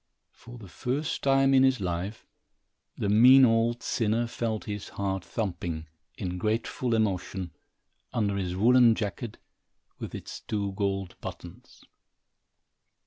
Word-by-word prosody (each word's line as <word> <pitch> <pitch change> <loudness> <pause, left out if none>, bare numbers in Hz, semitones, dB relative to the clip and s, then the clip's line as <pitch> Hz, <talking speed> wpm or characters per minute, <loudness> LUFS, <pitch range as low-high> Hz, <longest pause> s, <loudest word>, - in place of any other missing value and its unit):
For 120 +1 -13
the 110 -4 -11
first 130 - -3
time 135 0 +3
in 130 - +6
his 130 -2 +3
life, 95 +3 -4 0.7
the - - -1
mean 125 +6 +7
old 115 +1 +1
sinner 115 +1 0
felt 115 -2 -3
his 105 -2 -6
heart 95 -2 -3
thumping, 85 -6 -4 0.3
in 90 0 -4
grateful 115 +3 -1
emotion, 95 -4 -1 0.6
under 105 -5 0
his 90 -2 -2
woolen 120 +3 +5
jacket, 110 +1 -4 0.6
with - - -6
its - - -7
two 100 -2 -2
gold 95 -2 -2
buttons. - - -10
110 Hz, 125 wpm, -28 LUFS, 95-120 Hz, 0.7 s, mean